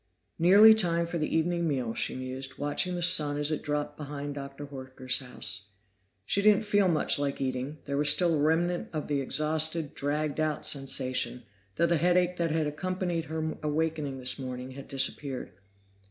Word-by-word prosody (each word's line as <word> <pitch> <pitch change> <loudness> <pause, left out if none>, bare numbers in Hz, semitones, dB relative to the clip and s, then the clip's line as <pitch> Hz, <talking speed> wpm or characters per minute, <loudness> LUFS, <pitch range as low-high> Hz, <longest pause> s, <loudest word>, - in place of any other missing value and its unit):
Nearly 200 +6 +8
time 170 -6 +1
for 170 0 -4
the 155 - 0
evening 170 +1 0
meal, 130 -6 -1
she - - -1
mused, 130 +1 -5
watching 145 +5 0
the 175 - -2
sun 150 -4 +5
as 150 +1 0
it 155 - -2
dropped 150 -1 -3
behind 145 -1 -6
Dr. 140 0 -7
Horker's 130 -2 -3
house. 115 -6 -4 0.6
She 200 - +1
didn't 210 +1 +4
feel 205 -2 +3
much 160 -4 +3
like 140 -1 -2
eating; 130 +2 -3
there 140 -1 -2
was 150 0 +3
still 170 +2 +4
a 155 - +1
remnant 170 +3 +1
of 155 -2 -3
the 145 -2 0
exhausted, 155 +2 0
dragged 150 +1 -2
out 155 -1 -1
sensation, 130 -2 -1 0.3
though 170 - +2
the 170 0 +2
headache 180 +2 +2
that 170 -1 0
had 155 0 0
accompanied 175 +2 -2
her 160 +1 -3
awakening 150 -2 -2
this 130 +1 -2
morning 130 0 -6
had 135 +1 -10
disappeared. 135 -2 -2
150 Hz, 175 wpm, -28 LUFS, 135-170 Hz, 0.6 s, Nearly